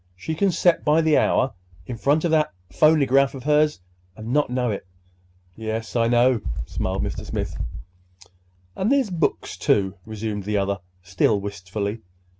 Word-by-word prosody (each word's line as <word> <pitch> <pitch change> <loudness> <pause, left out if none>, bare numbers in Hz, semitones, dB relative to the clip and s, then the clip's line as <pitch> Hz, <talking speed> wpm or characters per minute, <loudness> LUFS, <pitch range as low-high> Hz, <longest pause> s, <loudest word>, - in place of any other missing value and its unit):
She 125 - -4
can 195 +5 +2
set 175 0 +2
by 155 +2 +4
the 160 -2 +3
hour 130 - +2 0.3
in 125 - -5
front 145 +7 +1
of 170 - +1
that 155 -7 +2 0.2
phonygraph 140 - +4
of 130 - -8
hers, 150 -3 +2 0.4
and 110 +3 -5
not 150 -2 +2
know 125 -2 0
it!" 100 -2 -5 0.7
"Yes, 110 +1 -4
I 115 -1 +3
know," 120 0 +3 0.2
smiled 95 +1 -2
Mr. - - -4
Smith. - - -4 1.2
"And 200 +6 0
there's 270 -7 +2
books, 170 - -1
too," 95 -2 +2
resumed 105 -2 -4
the 105 0 0
other, 100 0 0 0.2
still 90 +2 +1
wistfully. 100 +2 -4
120 Hz, 155 wpm, -23 LUFS, 105-150 Hz, 1.2 s, by